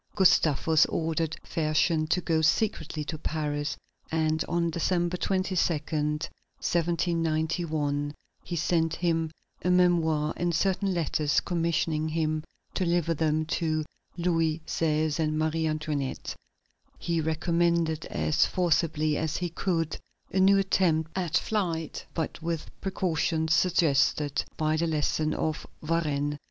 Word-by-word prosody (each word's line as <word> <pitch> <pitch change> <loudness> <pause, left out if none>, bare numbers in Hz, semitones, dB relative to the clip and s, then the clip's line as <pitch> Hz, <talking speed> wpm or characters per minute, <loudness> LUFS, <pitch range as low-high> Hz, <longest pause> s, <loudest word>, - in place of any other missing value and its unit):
Gustavus 160 -4 +4
ordered 160 -1 -1
Fersen 155 0 +1
to 180 - +2
go 160 -2 +1
secretly 160 -3 0
to 155 +1 -5
Paris, 145 -2 -2 0.3
and 160 0 +1
on 170 -1 +1
December 175 +1 0
22, 190 +1 -1
1791, 155 -1 -1 0.3
he 175 - -5
sent 165 0 +1
him 165 -2 0 0.3
a 180 - 0
memoir 165 -4 +3
and 175 -1 0
certain 195 +2 +1
letters, 155 -2 +1
commissioning 165 -2 0
him 155 -1 -1 0.3
to - - -1
deliver 170 -1 +1
them 155 0 +1
to 155 -1 -1 0.3
Louis 165 -2 +1
XVI. 155 -1 0
and 155 -1 0
Marie 160 +1 0
Antoinette. 155 -3 -3 0.6
He 170 -1 -1
recommended, 165 0 +1
as 155 - +2
forcibly 155 -3 +1
as 160 0 -1
he 175 -1 -2
could, 165 -2 -1 0.3
a 190 - +1
new 195 +1 +6
attempt 170 -5 +2
at 180 -5 +1
flight, 170 -7 -2
but 165 0 -3
with 165 -1 -3
precautions 165 -4 0
suggested 150 -5 +2
by 155 0 +1
the 170 +1 +1
lesson 155 0 0
of 155 -1 -2 0.2
Varennes. 150 -3 0
160 Hz, 120 wpm, -28 LUFS, 155-170 Hz, 0.6 s, new